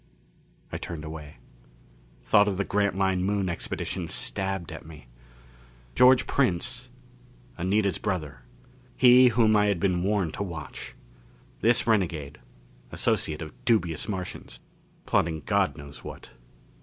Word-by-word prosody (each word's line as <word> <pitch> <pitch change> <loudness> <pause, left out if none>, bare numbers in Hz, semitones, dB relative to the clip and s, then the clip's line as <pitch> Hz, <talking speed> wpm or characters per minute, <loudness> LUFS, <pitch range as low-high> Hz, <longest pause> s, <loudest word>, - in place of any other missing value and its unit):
I - - -4
turned 80 -2 -6
away. 75 -3 -9 0.9
Thought 105 0 +4
of 100 -2 -1
the 100 - +1
Grantline 95 -2 +1
Moon 100 0 0
Expedition 85 -2 -3
stabbed 95 -3 -3
at - - -8
me. 75 -5 -13 0.9
George 125 - +6
Prince 125 +2 0 0.7
Anita's 100 +2 0
brother 90 -9 -3 0.6
he 125 0 +7
whom 110 -2 +4
I 105 0 +4
had 100 -4 +1
been 90 -2 +1
warned 95 -4 0
to - - -5
watch. 85 -7 -6 0.6
This 120 +1 +3
renegade 85 -10 0 0.5
associate 75 +1 0
of 75 - -9
dubious 90 -9 +1
Martians, 90 - -6 0.5
plotting 80 -2 +1
God - - +1
knows 70 0 -11
what. - - -10
95 Hz, 120 wpm, -27 LUFS, 80-105 Hz, 0.9 s, he